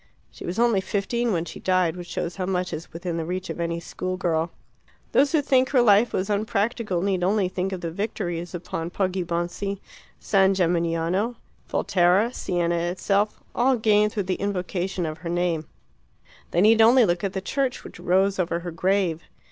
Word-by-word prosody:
She - - -9
was 175 +4 -3
only 230 -4 +3
fifteen 235 +5 -1
when 170 -3 0
she - - -9
died, 185 -3 +1
which 175 -1 -8
shows 170 +1 -4
how 185 -1 -2
much 180 -1 -1
is 155 +2 -6
within 170 0 -4
the 165 - -2
reach 185 +3 -4
of - - -7
any 170 0 -1
school 185 +2 -4
girl. 165 -3 0 0.6
Those 280 +1 +4
who 310 -3 +2
think 260 -2 +3
her 260 -3 +4
life 215 +1 +5
was 185 - -1
unpractical 210 -2 -1
need 190 -3 0
only 195 +1 +2
think 185 +1 -3
of 185 -2 -4
the 165 -1 -3
victories 175 -3 -3
upon 165 -1 -4
Poggibonsi, 185 +1 -2 0.4
San 195 -1 +3
Gemignano, 170 +5 0 0.3
Volterra, 185 +6 +2
Siena 175 -4 0
itself 195 +4 0
all 260 +2 +3
gained 210 -1 +3
through 205 - -2
the 185 -1 -3
invocation 185 -2 -2
of 155 -1 -5
her 170 0 -6
name; 170 -2 -1 0.8
they 175 - +1
need 220 +2 +6
only 235 +2 +7
look 175 -1 0
at 195 -1 -1
the 190 - -2
church 260 +6 -2
which - - -11
rose 190 +2 +2
over 170 -1 0
her 175 0 -5
grave. 180 -1 0
185 Hz, 180 wpm, -24 LUFS, 175-205 Hz, 0.8 s, only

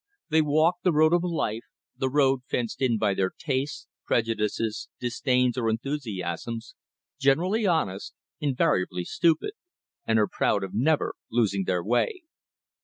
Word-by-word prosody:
They 160 0 +4
walk 155 +4 +3
the 180 - +4
road 155 +1 +4
of 175 - +4
life, 140 -10 -2 0.3
the 130 - -1
road 135 -1 +3
fenced 120 +1 -2
in 120 -4 +2
by 105 -2 +1
their 95 -1 +1
tastes, 140 -1 -2 0.2
prejudices, 110 -1 -1
disdains 125 0 +1
or 115 -2 +1
enthusiasms, 115 - -4 0.5
generally 180 +10 +2
honest, 100 - -1 0.2
invariably 95 - +1
stupid, 170 - +1 0.6
and 110 - +3
are 105 -1 +3
proud 100 - 0
of 95 - -6
never 150 +6 +1 0.2
losing 100 -5 +1
their 90 -2 0
way. 345 - 0
125 Hz, 135 wpm, -26 LUFS, 110-155 Hz, 0.6 s, They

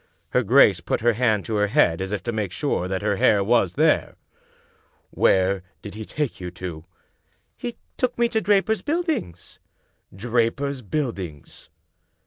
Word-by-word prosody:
Her 125 - +2
grace 105 -6 +5
put 85 - -2
her 120 +1 +3
hand 110 -3 +1
to 110 -2 -2
her 105 0 +2
head 85 -4 +2
as 95 +1 -3
if 105 - -3
to 120 - -2
make 105 -5 -3
sure 90 0 -1
that 95 +1 -3
her 105 -1 0
hair 100 +1 +4
was 100 -4 +2
there. - - +2 1.0
"Where 95 0 +2 0.2
did 105 - -8
he 110 +1 -7
take 150 -6 -3
you 90 - -4
to?" 85 -2 -8 0.4
" - - -47 0.3
He 240 -1 -6 0.2
took 255 -1 -1
me 235 0 +3
to 220 - 0
Draper's 205 +2 +2
Buildings." 310 - -3 0.5
"Draper's 120 +6 -1
Buildings?" 100 - -5
110 Hz, 160 wpm, -23 LUFS, 95-140 Hz, 1.0 s, grace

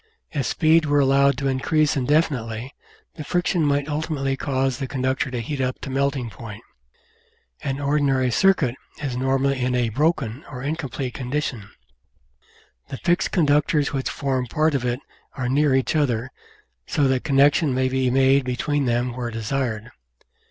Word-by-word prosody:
If 140 -6 -1
speed 160 +3 +3
were 145 0 +2
allowed 140 0 +4
to 140 - -1
increase 140 +3 +1
indefinitely 130 -4 0 0.4
the 155 - -5
friction 175 +1 0
might 145 -1 +1
ultimately 150 -3 -1
cause 135 -1 -1
the 135 - -3
conductor 130 0 -1
to 125 -2 -3
heat 135 +4 -3
up 130 0 -1
to 135 - -6
melting 135 -3 -1
point. 105 -2 -9 1.0
An 135 0 -3
ordinary 140 -3 +1
"circuit" 155 - +3 0.3
is 140 -4 -3
normally 135 +1 +1
in 125 0 0
a 120 -2 +1
"broken" 140 -1 0
or 125 -2 -7
incomplete 140 -3 -3
condition. 125 -5 -3 1.2
The 135 - -6
fixed 175 +4 +1
conductors 150 -2 +2
which 135 -1 -1
form 130 -3 -2
part 155 +5 +1
of 135 -3 0
it 120 +2 -1 0.3
are 130 -2 -3
near 140 +1 +3
each 130 +3 +1
other, 130 -4 0 0.6
so 145 -2 +2
that 130 -1 +1
connection 145 +1 +3
may 130 0 +1
be 130 0 +1
made 135 +1 +4
between 135 +3 -1
them 120 0 0
where 125 -1 -3
desired. 115 0 -3
135 Hz, 155 wpm, -23 LUFS, 125-145 Hz, 1.2 s, allowed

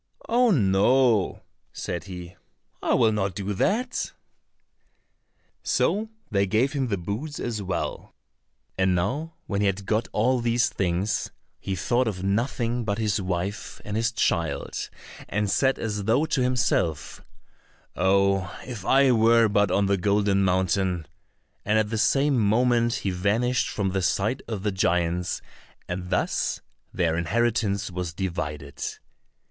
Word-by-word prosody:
"Oh, 245 +1 +4
no," 115 - +3 0.3
said 85 0 -5
he, 90 -2 -8 0.5
"I - - +2
will 110 - +4
not 100 -4 -1
do 100 +1 -3
that." 230 - 0 1.5
So 215 +2 +1 0.2
they 100 -1 +2
gave 115 +7 +2
him 135 -3 0
the 100 -4 -1
boots 110 - -5
as 115 -3 -3
well. 90 -3 -4 0.6
And 95 -1 +3
now 140 - -2
when 100 -1 -1
he 105 - +3
had 100 0 -2
got 110 +3 0
all 125 +4 +2
these 120 0 +2
things, 95 +3 -1 0.3
he 95 - -3
thought 120 +7 +1
of 95 -4 -3
nothing 120 +3 0
but 100 -2 -1
his 105 -2 0
wife 95 +3 -3
and 105 - -4
his 115 +1 +1
child, 85 -10 -1 0.4
and 105 -1 0
said 135 +4 +2
as 105 -3 -3
though 120 +8 +3
to 150 -4 0
himself, 120 - 0 0.7
"Oh, 95 0 +2
if 120 -6 -7
I 135 +5 +5
were 115 0 +5
but 100 -1 +2
on 100 +2 +2
the 100 0 +2
Golden 100 +1 +2
Mountain," 95 -2 +1 0.6
and 105 +1 +2
at 110 0 +1
the 110 - -1
same 135 +3 +3
moment 120 +2 +3
he 95 - +1
vanished 110 +7 +1
from 100 -2 -1
the 95 0 0
sight 105 +7 0
of 105 -4 -4
the 105 - +1
giants, 90 -2 0 0.4
and 90 0 -4
thus 90 - 0 0.3
their 85 -3 0
inheritance 105 +2 0
was 90 -2 -4
divided. 75 -7 -4
100 Hz, 140 wpm, -25 LUFS, 95-120 Hz, 1.5 s, I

